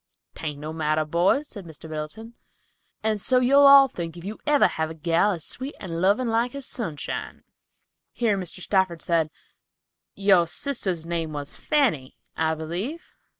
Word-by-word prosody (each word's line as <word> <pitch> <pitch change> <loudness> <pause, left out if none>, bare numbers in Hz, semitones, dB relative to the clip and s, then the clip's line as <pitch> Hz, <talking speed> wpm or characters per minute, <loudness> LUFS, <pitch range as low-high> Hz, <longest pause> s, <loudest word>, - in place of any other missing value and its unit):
"'Tain't 150 -3 -5
no 150 +2 -6
laughin' 160 - -8
matter, 155 0 +1
boys," 175 - +2
said 200 -7 -9
Mr. 160 -1 -11
Middleton, 155 +9 -7 0.7
"and 215 -2 0
so 255 - +3
you'll 275 +3 +6
all 275 -1 +9
think 170 -7 -6
if 170 - -10
you 210 +2 -6
ever 295 -1 +5
have 160 0 -1
a 160 - -8
gal 165 +6 +2
as 165 -4 -5
sweet 265 +3 -4
and 170 -2 -5
lovin' 205 +7 +3
like 230 +3 0
as 280 -2 -6
Sunshine." 165 - -5 0.7
Here 225 -4 +1
Mr. 185 -1 -5
Stafford 185 -3 +1
said, 165 -2 +1 0.9
"Your 195 -4 +4
sister's 190 - -2
name 165 -2 -3
was 145 -1 -5
Fanny, 240 - 0 0.2
I 160 0 0
believe." 180 - -5
180 Hz, 165 wpm, -25 LUFS, 160-235 Hz, 0.9 s, all